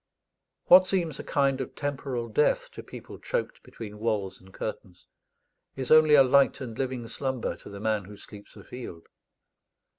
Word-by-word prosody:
What 185 +1 +8
seems 170 -7 -1
a - - -5
kind 135 -1 +1
of 130 - -7
temporal 135 -4 -3
death 130 +7 +1
to - - -9
people - - -11
choked - - -3
between 105 -2 -10
walls 105 -4 -2
and 95 0 -17
curtains, 95 -3 -7 0.7
is 130 -2 -5
only 155 -1 +7
a 135 - +8
light 140 +1 +4
and 120 -4 -6
living 130 -2 -3
slumber 130 +2 -3
to - - -13
the 100 0 -9
man 110 -2 -1
who 105 +1 -12
sleeps 105 0 -13
afield. 120 -10 -9
125 Hz, 160 wpm, -27 LUFS, 105-140 Hz, 0.7 s, What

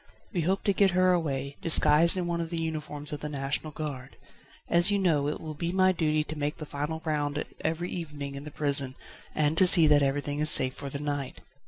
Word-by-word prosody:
We 175 - -1
hope 190 +4 -1
to 200 - +1
get 190 -2 +2
her 185 0 +3
away, 140 -5 -3
disguised 165 0 +5
in 180 - -2
one 170 -1 -2
of 165 - -5
the 170 -1 -4
uniforms 150 -2 -4
of 150 - -6
the 150 - -5
National 140 +2 -4
Guard. 140 -4 -7 0.5
As 175 +3 +3
you 205 - +1
know, 160 -7 +1
it 150 - -4
will 155 -1 -7
be 170 +3 -4
my 185 0 +3
duty 155 -3 0
to 155 0 -8
make 145 +1 -2
the 155 - -8
final 150 +3 -5
round 150 -1 -2 0.2
every 165 +3 -3
evening 150 -5 -6
in 140 0 -8
the 150 - -8
prison, 140 -3 +1 0.4
and 155 +1 0
to 185 - +5
see 175 -3 +8
that 150 -1 +4
everything 145 +1 -2
is 155 0 +5
safe 130 -3 +5
for 140 - -8
the 140 - -6
night. 145 -2 -5
150 Hz, 225 wpm, -27 LUFS, 145-170 Hz, 0.5 s, see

